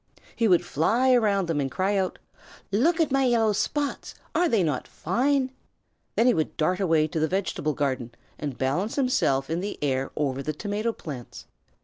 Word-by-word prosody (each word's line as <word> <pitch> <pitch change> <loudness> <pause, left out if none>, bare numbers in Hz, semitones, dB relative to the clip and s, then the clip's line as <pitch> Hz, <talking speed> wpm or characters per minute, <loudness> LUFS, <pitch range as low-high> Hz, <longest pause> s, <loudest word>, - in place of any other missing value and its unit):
He 230 - +2
would 175 -3 +4
fly 230 - +2
around 205 -6 +2
them 165 -3 0
and 135 - -1
cry 190 +8 0
out: 190 -2 0 0.5
"Look 315 - +2
at 320 -3 +2
my 270 0 +3
yellow 225 -3 +3
spots. 285 +7 -2 0.2
Are 350 -1 +2
they 215 -5 +3
not 150 -6 -1
fine?" 260 - 0 0.6
Then 230 - +3
he 250 - +5
would 155 - -2
dart 180 +4 +1
away 165 -5 +3
to 160 - -3
the 155 - +2
vegetable 175 -4 -1
garden 130 -4 -2 0.3
and 145 -4 -4
balance 160 +12 -1
himself 140 - +1
in 165 +1 -1
the 200 +3 -4
air 135 -2 0
over 140 -2 -1
the 155 +2 -3
tomato 210 +7 -2
plants. 140 - -9
185 Hz, 185 wpm, -26 LUFS, 150-235 Hz, 0.6 s, he